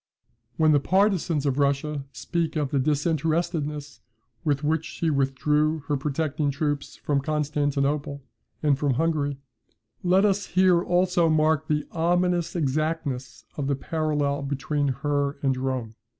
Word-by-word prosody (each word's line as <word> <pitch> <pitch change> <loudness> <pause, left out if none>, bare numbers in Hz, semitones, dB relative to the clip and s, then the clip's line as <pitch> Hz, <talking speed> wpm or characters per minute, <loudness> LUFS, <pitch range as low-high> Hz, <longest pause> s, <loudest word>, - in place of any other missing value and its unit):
When 155 -1 +4
the 145 - +5
partisans 185 -3 +1
of 140 0 0
Russia 140 0 0
speak 170 +1 -2
of 145 -3 -1
the 140 - +2
disinterestedness 150 0 -1 0.4
with 145 -3 0
which 160 +1 +1
she 165 0 -2
withdrew 150 +3 +1
her 145 - +2
protecting 150 +1 -1
troops 145 0 -2
from 140 -2 -1
Constantinople, 145 -1 -1 0.4
and 145 -3 +3
from 140 -4 +1
Hungary, 150 -2 0 0.6
let 185 +3 +4
us 200 -1 +1
here 185 -1 +4
also 180 -1 +2
mark 155 0 +2
the 150 -1 0
ominous 175 +1 +1
exactness 145 -4 -2
of 140 -2 -2
the 140 - +1
parallel 145 -1 -1
between 140 +1 -1
her 140 +2 -1
and 135 -1 +2
Rome. 130 -3 -3
150 Hz, 135 wpm, -25 LUFS, 140-160 Hz, 0.6 s, the